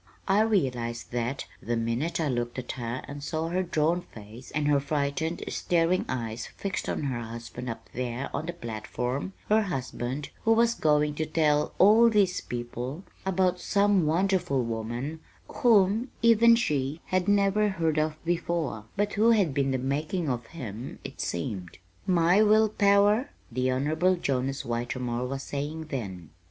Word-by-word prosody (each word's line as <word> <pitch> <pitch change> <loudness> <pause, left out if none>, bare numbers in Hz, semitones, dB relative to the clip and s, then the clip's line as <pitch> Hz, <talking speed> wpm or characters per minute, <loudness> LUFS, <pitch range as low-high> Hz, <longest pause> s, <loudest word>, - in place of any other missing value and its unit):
I 200 +2 +4
realized 125 - 0
that, 120 +2 -2 0.2
the 120 0 -1
minute 115 +10 -1
I 160 - +1
looked 120 -2 -2
at 125 -1 -4
her 120 0 -4
and 140 0 -7
saw 160 +2 -2
her 180 +2 0
drawn 170 0 +1
face 110 -1 -12
and 150 -1 -1
her 145 -1 +4
frightened, 145 +3 -2
staring 175 +1 +1
eyes 115 -2 -3
fixed 195 -1 -3
on - - -2
her 130 -4 -2
husband 115 +2 -7
up 115 0 -7
there 125 +2 -3
on 160 - -3
the 175 - -3
platform 125 - -4
her 215 +1 +4
husband, 135 - -3
who 225 - +5
was 230 +1 +4
going 150 -3 +2
to 155 +1 -2
tell 150 -2 +1
all 220 +4 +7
these 200 -5 +2
people 125 +6 -5 0.2
about 185 -1 +2
some 200 -4 +2
wonderful 175 -5 +1
woman 120 +7 -4 0.4
whom 220 +1 +4
even 230 0 +7
she 145 - -1
had 185 0 +2
never 205 +1 +3
heard 165 -5 0
of 155 0 0
before, 165 -9 -1
but 205 +1 0
who 220 +3 +4
had 200 -10 +3
been 135 0 +1
the 130 - +1
making 150 +6 -2
of 120 -2 -3
him, 120 -6 -7
it - - -7
seemed. 90 0 -4 0.3
"My 180 +2 +4
will 215 0 +5
power?" 205 +5 +3 0.2
the 130 +2 0
Honorable 155 +8 +2
Jonas 135 -4 -1
Whitermore 120 +1 -2
was 135 +1 -4
saying 150 +3 -4
then. 95 - -5
150 Hz, 160 wpm, -27 LUFS, 125-185 Hz, 0.4 s, all